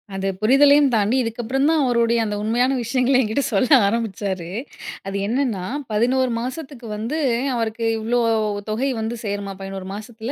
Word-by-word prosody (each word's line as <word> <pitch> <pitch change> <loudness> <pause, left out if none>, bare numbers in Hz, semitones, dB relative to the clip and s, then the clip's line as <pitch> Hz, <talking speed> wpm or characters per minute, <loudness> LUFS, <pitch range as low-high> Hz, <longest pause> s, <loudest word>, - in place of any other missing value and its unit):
அது, 195 0 -2
புரிதலையும் 280 +5 +5
தாண்டி 215 +2 +2
இதுக்கப்பறந்தான் 265 +7 0
அவருடைய 235 -1 +2
அந்த 210 -1 -2
உண்மையான 245 +4 +1
விஷயங்கள 255 +2 +2
என்கிட்ட 245 +4 0
சொல்ல 210 +5 +2 0.2
ஆரம்பிச்சாரு. 200 -5 -2 0.6
அது 195 0 -3
என்னன்னா, 230 -6 -1 0.3
11 250 +4 +2
மாசத்துக்கு 255 -1 -6
வந்து, 230 +9 -3 0.4
அவருக்கு 230 0 -2
இவ்ளோ 235 +3 0 0.4
வ் 205 - -5
தொகை 240 +6 0
வந்து 220 +2 -3
சேருமா! 200 -1 -3
11 195 -1 -6
மாசத்தில 220 +3 -7
230 Hz, 140 wpm, -21 LUFS, 210-255 Hz, 0.6 s, புரிதலையும்